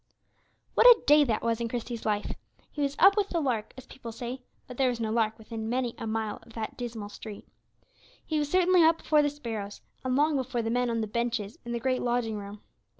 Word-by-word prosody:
What -, -, +6 dB
a 480 Hz, -2 st, +9 dB
day 295 Hz, +1 st, +7 dB
that 220 Hz, -4 st, -1 dB
was 230 Hz, 0 st, 0 dB
in 235 Hz, -, 0 dB
Christie's 235 Hz, -1 st, -4 dB
life! 210 Hz, -1 st, -1 dB, 0.4 s
He 295 Hz, -, -5 dB
was 280 Hz, 0 st, 0 dB
up 390 Hz, +2 st, +7 dB
with 410 Hz, -2 st, +1 dB
the 340 Hz, -, 0 dB
lark, 240 Hz, -8 st, -1 dB
as 260 Hz, -, -10 dB
people 235 Hz, -3 st, -9 dB
say, 245 Hz, +3 st, -6 dB, 0.2 s
but 250 Hz, -, -10 dB
there 265 Hz, -2 st, +3 dB
was 240 Hz, -2 st, -3 dB
no 220 Hz, -1 st, -1 dB
lark 220 Hz, -1 st, +1 dB
within 220 Hz, 0 st, -6 dB
many 245 Hz, -1 st, -1 dB
a 225 Hz, -, -4 dB
mile 220 Hz, -1 st, -2 dB
of 230 Hz, -, -17 dB
that 220 Hz, -1 st, -5 dB
dismal 225 Hz, -4 st, -6 dB
street. 210 Hz, 0 st, -10 dB, 0.8 s
He 310 Hz, -1 st, 0 dB
was 295 Hz, -1 st, -1 dB
certainly 365 Hz, +1 st, +4 dB
up 325 Hz, +1 st, +5 dB
before 305 Hz, -2 st, +3 dB
the 290 Hz, -, +2 dB
sparrows, 225 Hz, -8 st, -6 dB, 0.2 s
and 255 Hz, -1 st, 0 dB
long 295 Hz, +1 st, +3 dB
before 250 Hz, -2 st, -2 dB
the 225 Hz, -, -1 dB
men 245 Hz, 0 st, +1 dB
on 230 Hz, -1 st, 0 dB
the -, -, 0 dB
benches 230 Hz, -1 st, -2 dB
in 235 Hz, -, -5 dB
the 235 Hz, -, -1 dB
great 255 Hz, +1 st, 0 dB
lodging 240 Hz, -3 st, -1 dB
room. 200 Hz, +1 st, -9 dB
240 Hz, 230 wpm, -28 LUFS, 220-275 Hz, 0.8 s, a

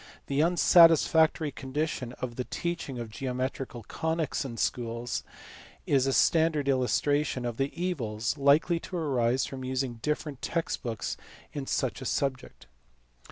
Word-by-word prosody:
The 140 Hz, +1 st, +1 dB
unsatisfactory 165 Hz, -2 st, +5 dB
condition 135 Hz, -3 st, -3 dB
of 125 Hz, -1 st, -5 dB
the 125 Hz, -, -2 dB
teaching 170 Hz, -6 st, -4 dB
of 115 Hz, -2 st, -6 dB
geometrical 130 Hz, 0 st, -4 dB
conies 160 Hz, -2 st, -1 dB
in 120 Hz, -4 st, -6 dB
schools 115 Hz, -1 st, -2 dB, 0.6 s
is 135 Hz, -2 st, +2 dB
a -, -, +2 dB
standard 160 Hz, -3 st, +3 dB
illustration 135 Hz, 0 st, +1 dB
of 120 Hz, -2 st, -3 dB
the 135 Hz, +1 st, 0 dB
evils 115 Hz, -12 st, -1 dB
likely 145 Hz, +5 st, +3 dB
to 180 Hz, -, -6 dB
arise 130 Hz, -5 st, +1 dB
from 130 Hz, -1 st, -7 dB
using 130 Hz, -2 st, -2 dB
different 150 Hz, -1 st, -3 dB
text 165 Hz, -1 st, -2 dB
books 115 Hz, -4 st, -4 dB, 0.4 s
in 140 Hz, -2 st, -5 dB
such 130 Hz, 0 st, -1 dB
,a -, -, -6 dB
subject. 135 Hz, 0 st, -2 dB
135 Hz, 135 wpm, -28 LUFS, 125-155 Hz, 0.6 s, unsatisfactory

